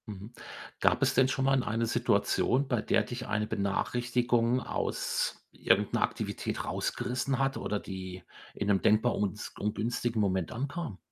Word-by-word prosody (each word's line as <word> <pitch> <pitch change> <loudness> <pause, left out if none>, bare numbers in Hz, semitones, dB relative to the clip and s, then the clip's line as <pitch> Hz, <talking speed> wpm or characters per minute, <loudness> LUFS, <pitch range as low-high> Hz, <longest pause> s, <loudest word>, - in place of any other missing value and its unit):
Mhm. 105 +2 -8 0.5
Gab - - +3
es - - +3
denn 130 - +5
schon 135 0 0
mal 135 - +4
in 130 - +1
eine 115 +2 0
Situation, 120 +3 +2
bei 120 -4 +1
der 110 - +2
dich 125 +1 -6
eine 105 0 0
Benachrichtigung 120 +4 +1
aus - - -2
irgendeiner - - +2
Aktivität - - -2
rausgerissen 135 - -1
hat 135 0 +1
oder 105 - -2
die 95 -2 -7 0.3
in 105 - -2
'nem 100 -2 +3
denkbar 110 +3 +3
uns 105 0 -3
ungünstigen 115 +2 -1
Moment 95 -4 +1
ankam? 140 - -4
115 Hz, 150 wpm, -30 LUFS, 105-130 Hz, 0.5 s, denn